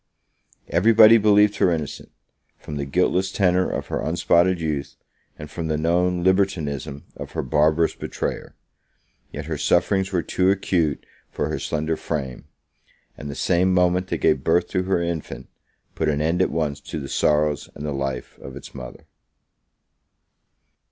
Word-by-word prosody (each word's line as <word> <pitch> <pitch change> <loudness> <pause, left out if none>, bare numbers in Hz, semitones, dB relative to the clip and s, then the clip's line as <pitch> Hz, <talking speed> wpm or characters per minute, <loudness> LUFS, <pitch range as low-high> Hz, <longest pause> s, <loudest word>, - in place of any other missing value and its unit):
Every 95 +9 +3
body 110 +1 +8
believed 105 0 +4
her - - +3
innocent, 80 -4 -4 0.5
from 75 - -7
the 70 - -3
guiltless 90 +5 +1
tenor 90 -2 +2
of - - -3
her - - -2
unspotted 85 +2 +2
youth, 75 -3 -3 0.4
and 75 - -8
from 80 +2 -5
the 80 -1 0
known 90 +2 +1
libertinism 80 -7 0
of - - -8
her - - -2
barbarous 75 +4 +2
betrayer. - - -5 0.8
Yet - - -6
her - - -4
sufferings 95 -1 +1
were 90 -3 0
too 95 0 +1
acute 90 -6 0 0.2
for - - -3
her - - -3
slender 80 +1 -2
frame; 65 -6 -5 0.7
and 75 - -8
the 70 - -6
same 90 +1 +2
moment 90 0 +2
that - - -2
gave 65 - +1
birth 85 +2 +2
to 90 - 0
her 95 -2 +1
infant, 80 -6 -5 0.4
put 80 - -1
an 75 -1 0
end 80 +4 +1
at - - +2
once 75 -3 -2
to 80 - -6
the 70 - -6
sorrows 75 +1 +1
and 75 - -7
the 75 - -2
life 70 -1 -4
of - - -10
its - - -11
mother. 65 -3 -10
85 Hz, 160 wpm, -23 LUFS, 75-90 Hz, 0.8 s, body